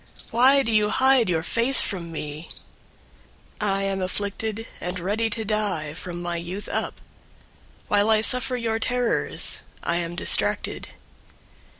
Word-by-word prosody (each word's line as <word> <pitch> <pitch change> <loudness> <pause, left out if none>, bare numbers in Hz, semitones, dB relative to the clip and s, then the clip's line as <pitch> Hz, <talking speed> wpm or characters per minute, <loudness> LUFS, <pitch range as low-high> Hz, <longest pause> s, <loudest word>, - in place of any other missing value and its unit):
Why 265 +4 +5
do 230 - -1
you 210 -1 +3
hide 260 -4 +3
your 160 -2 0
face 235 +8 +5
from 170 -5 -4
me? 150 0 -7 1.1
088:015 210 - -1
I 195 0 +1
am 195 -1 -1
afflicted 205 +4 -2
and 180 +1 -4
ready 210 +6 -1
to 220 0 -3
die 200 -8 -1
from 175 +1 -7
my 175 0 -2
youth 180 +4 -6
up. - - -3 0.9
While 205 +1 +2
I 215 -1 +4
suffer 250 +2 +1
your 225 -2 -1
terrors, 245 0 0 0.2
I 170 - 0
am 170 0 -3
distracted. - - +1
205 Hz, 140 wpm, -24 LUFS, 175-225 Hz, 1.1 s, Why